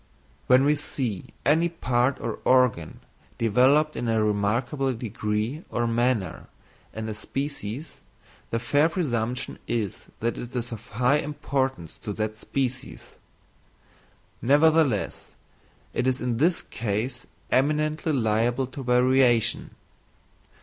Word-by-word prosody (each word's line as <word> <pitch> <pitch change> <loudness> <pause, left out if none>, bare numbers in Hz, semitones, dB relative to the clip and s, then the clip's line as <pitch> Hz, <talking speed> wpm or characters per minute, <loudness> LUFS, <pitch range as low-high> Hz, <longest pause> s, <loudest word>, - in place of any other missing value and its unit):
When 130 +1 +6
we 145 - +5
see 130 -8 -3 0.2
any 160 +5 +4
part 130 -5 0
or 115 - -4
organ 125 -11 +2 0.4
developed 130 +7 +3
in 120 - -2
a 110 -1 +2
remarkable 115 +7 0
degree 110 - -3
or 120 - 0
manner 115 -6 0 0.4
in 110 0 -5
a 110 - -3
species, 135 +3 -5 0.5
the 115 - 0
fair 145 +7 +2
presumption 125 -9 -2
is 110 -5 -2
that 115 +1 -1
it 120 +1 -8
is 120 0 -3
of 115 +1 -8
high 125 +6 +2
importance 135 - -2
to 105 - -5
that 110 +1 -2
species: 130 +3 -4 1.2
nevertheless 145 -3 +2 0.6
it 130 - 0
is 130 0 +1
in 120 -2 -1
this 170 +6 +2
case 115 +3 -3 0.2
eminently 150 +3 +1
liable 120 0 +1
to 130 +2 -8
variation. 125 -2 +3
125 Hz, 115 wpm, -26 LUFS, 115-140 Hz, 1.2 s, When